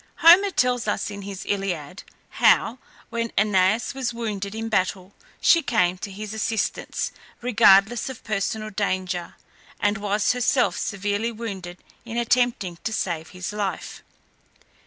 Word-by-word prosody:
Homer 355 +5 +7
tells 250 -8 +1
us - - -1
in 200 0 -7
his 195 -1 -7
Iliad, 185 -3 -3 0.4
how, 235 +3 +4 0.3
when 230 0 -2
Æneas 200 +3 +2
was 255 -3 -3
wounded 210 -3 -4
in 225 0 -3
battle, 190 -2 -1 0.3
she 335 - +5
came 185 - +1
to 200 - -5
his 210 +2 -7
assistance, 220 -1 -2 0.3
regardless 225 -1 +4
of 260 - -9
personal 215 +1 -2
danger, 185 -3 -2 0.4
and 205 0 +1
was 205 0 +1
herself 250 +1 +2
severely 205 +3 -2
wounded 195 -6 -7 0.2
in 235 0 -6
attempting 235 -7 +1
to - - -2
save 170 -6 -2
his 180 +2 -6
life. 200 -4 -4
210 Hz, 135 wpm, -24 LUFS, 190-235 Hz, 0.4 s, Homer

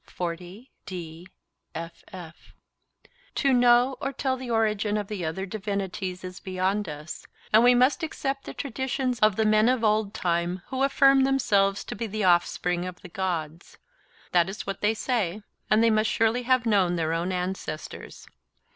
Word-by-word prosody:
'To 175 -1 -7 2.3
know 245 +1 +5
or 275 - -1
tell 265 0 -1
the 255 -1 -7
origin 215 -2 +1
of 205 -2 -3
the 200 -4 -5
other 160 +4 -3
divinities 195 -2 -4
is 180 0 -7
beyond 190 +1 -1
us, 150 +2 -8 0.3
and 220 +2 +7
we 245 0 +6
must 255 +4 +3
accept 275 -4 -3
the - - -7
traditions 265 -1 -2
of 215 -2 +4
the 220 - +1
men 215 +2 +4
of 255 -2 +1
old 215 -1 +2
time 175 -1 -1
who 260 0 -3
affirm 275 0 +5
themselves 200 -7 +2
to - - -6
be 225 +2 -4
the 215 0 -3
offspring 175 0 +2
of 180 -1 -8
the 180 - -9
Gods—that 175 - -3
is 200 - -6
what 195 - -5
they 210 +2 +2
say—and 215 -1 -1
they 230 - +4
must 215 0 +2
surely 225 +2 +1
have 255 0 +2
known 195 -5 +2
their 160 -1 -1
own 170 +3 -1
ancestors. 180 -3 -5
210 Hz, 150 wpm, -26 LUFS, 180-245 Hz, 2.3 s, and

